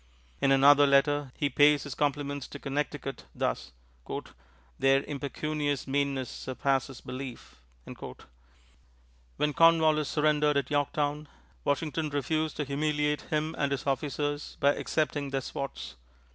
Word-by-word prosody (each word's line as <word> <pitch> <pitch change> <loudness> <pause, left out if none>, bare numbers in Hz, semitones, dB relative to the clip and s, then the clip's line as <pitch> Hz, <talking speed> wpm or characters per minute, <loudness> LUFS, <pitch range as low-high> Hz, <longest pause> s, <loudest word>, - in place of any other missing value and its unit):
In 135 - +3
another 140 +1 +7
letter 140 0 +3
he 145 - +1
pays 145 +2 +4
his 140 - -6
compliments 145 -1 -1
to - - -8
Connecticut 140 0 -4
thus: - - -2 1.1
"Their 135 0 +4
impecunious 145 0 -2
meanness 140 -1 0
surpasses 135 +1 -2
belief." 125 - -8 1.8
When 150 0 +1
Cornwallis 160 -2 +4
surrendered 150 -1 +2
at 140 -1 -1
Yorktown, 145 +1 0 0.4
Washington 155 +2 -1
refused 155 +2 -1
to 150 - -1
humiliate 150 +1 0
him 155 +1 0
and 140 -1 +1
his 140 -2 -2
officers 145 +2 -2
by 140 0 +4
accepting 145 -3 -1
their 135 0 -1
swords. 70 - -6
145 Hz, 115 wpm, -29 LUFS, 135-150 Hz, 1.8 s, another